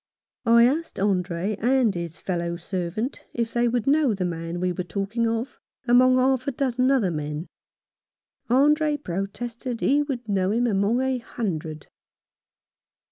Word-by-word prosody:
I 235 0 +7
asked 310 +3 -1
Andre 190 0 0
and 245 -2 +3
his 170 -2 -5
fellow 170 -2 -3
servant 185 +7 -4
if 235 -1 -2
they 240 0 +2
would 240 -1 0
know 280 -5 +3
the 185 -2 -2
man 165 0 -4
we 180 0 0
were 180 - -3
talking 200 +6 -2
of 230 +3 -3 0.3
among 255 +1 +6
half 255 0 +2
a - - +1
dozen 255 -1 0
other 245 -10 +2
men. 150 +1 -4 1.0
Andre 295 +4 +3
protested 230 +5 -5
he 285 +2 +3
would 260 -5 -4
know 190 -2 +1
him 235 +4 +1
among 215 +2 +1
a 260 -1 0
hundred. 160 -10 -4
230 Hz, 145 wpm, -24 LUFS, 180-255 Hz, 1.0 s, I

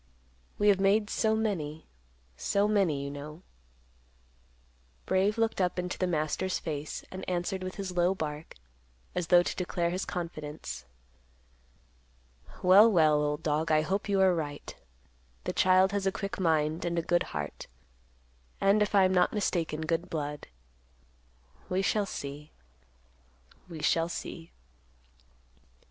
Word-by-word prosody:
We 205 - +4
have 195 -2 +4
made 205 +2 +2
so 220 -1 +2
many, 165 -9 -2 0.5
so 200 - +1
many, 190 -10 +1
you 140 - -4
know." 150 +4 -9 1.6
Brave 195 +3 +1
looked 225 -3 +1
up 180 0 0
into 180 0 -3
the 185 - +1
master's 175 +3 -1
face, 150 -2 -5
and 185 - -7
answered 180 +1 -2
with 185 0 -5
his 195 -3 -5
low 175 +2 +2
bark, 150 -2 -5 0.6
as 180 -2 -2
though 175 0 +6
to - - -3
declare 175 -1 -1
his 185 +2 -2
confidence. 155 - -6 1.8
"Well, 200 +5 +7
well, 155 -5 +4
old 150 0 -1
dog, 155 +1 0
I 155 0 +4
hope 195 +5 -2
you 200 -1 +2
are 190 -1 +5
right. 145 -4 -5 0.7
The - - -3
child 185 +1 +4
has 200 -1 -1
a - - +3
quick 200 0 -5
mind, 160 -2 +1
and 170 0 -2
a 170 - +1
good 175 +1 +2 0.2
heart; 75 0 -6 0.9
and, 200 +2 +3
if 210 0 +1
I 195 - +6
am 185 0 +3
not 180 -1 +3
mistaken, 170 -7 -1
good 165 +2 -1
blood. 150 -2 -4 1.2
We 185 +1 0
shall 205 0 +1
see. 145 0 -7 1.2
We 160 -3 -8
shall 165 +2 +2
see." 165 -1 -7
175 Hz, 140 wpm, -29 LUFS, 155-195 Hz, 1.8 s, Well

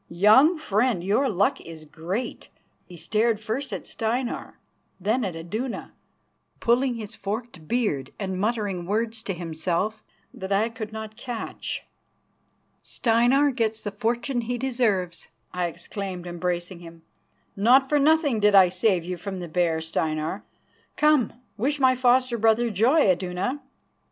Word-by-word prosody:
Young 215 - +5
friend, 220 - +1
your 220 +8 +2
luck 200 0 +1
is 160 -2 -10
great," 180 +11 -5
and - - -36 0.3
he 180 - -11
stared 215 +6 +1
first 230 +6 -3
at - - -5
Steinar, 235 +2 -3 0.4
then 220 +7 +1
at 185 -5 -3
Iduna, 215 +10 -5 0.7
pulling 245 +2 +2
his 215 -3 -7
forked 205 -5 -6
beard 180 - -1
and 190 -2 -3
muttering 205 -5 -1
words 220 +2 -1
to 195 -5 -4
himself 175 +5 -2 0.3
that 190 +1 -7
I 210 +4 +2
could 225 -2 -7
not 220 0 -7
catch. 240 -4 -5 1.0
"Steinar 245 +5 +2
gets 225 -3 -1
the 205 - -3
fortune 240 +5 -1
he 245 +2 -3
deserves," 225 -9 -1 0.3
I 180 -1 0
exclaimed, 180 +2 -6
embracing 175 0 -3
him. 165 -1 -13 0.5
"Not 250 +6 +5
for 295 +1 +2
nothing 295 -4 +3
did 210 -1 +4
I 190 -2 +8
save 185 -1 +1
you 180 0 -4
from 190 +2 -6
the 175 - -5
bear, 165 -1 +1
Steinar. 160 +2 -2 0.5
Come, 300 -6 +4 0.3
wish 280 +7 0
my 260 -1 +5
foster 250 -1 +3
brother 225 +2 +3
joy, 240 - +4
Iduna." 190 +6 0
215 Hz, 140 wpm, -25 LUFS, 180-240 Hz, 1.0 s, I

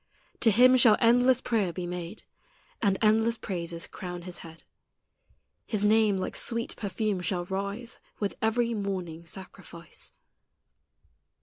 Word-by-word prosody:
To 230 - +5
Him 250 +4 +6
shall 230 -4 +6
endless 245 +2 +4
prayer 210 -7 0
be 180 +1 -5
made, 175 +3 -6 0.6
And 200 -4 +2
endless 225 +2 +3
praises 170 -4 -4
crown 180 -2 -7
His 180 0 -6
head; 165 0 -12 1.0
His 210 -2 0
name 215 -1 +4
like 185 - -3
sweet 230 0 -1
perfume 205 -1 -2
shall 180 -1 -1
rise 200 +5 -4 0.2
With 205 -2 -1
every 230 +1 +1
morning 185 -6 -4
sacrifice. 175 -3 -9
200 Hz, 125 wpm, -28 LUFS, 180-225 Hz, 1.0 s, Him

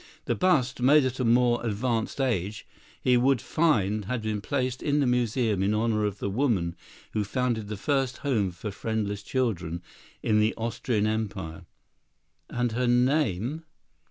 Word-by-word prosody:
The - - +1
bust, 145 -10 +1
made 140 +3 +6
at 130 +1 -2
a - - +1
more 120 0 +3
advanced 115 +2 -1
age, 110 -6 -1 0.3
he 125 -1 +3
would 130 +1 +3
find 110 - +1
had 120 +1 -3
been 110 -1 -2
placed 130 +1 -2
in 145 -1 +1
the 140 - +3
museum 120 -4 +1
in 100 +2 +2
honor 110 -1 +1
of 105 -1 -2
the 100 - -3
woman 100 -6 0 0.4
who 105 - +1
founded 115 0 -1
the 105 0 -5
first 135 +2 0
home 110 -9 +2
for 90 +4 -6
friendless 105 -1 -2
children 95 -8 -2 0.4
in 105 -1 +3
the 110 +1 +2
Austrian 115 -1 -1
Empire; 105 -7 -3 0.8
and 120 -1 -1
her 125 +2 0
name? 125 - +1
115 Hz, 155 wpm, -27 LUFS, 105-130 Hz, 0.8 s, made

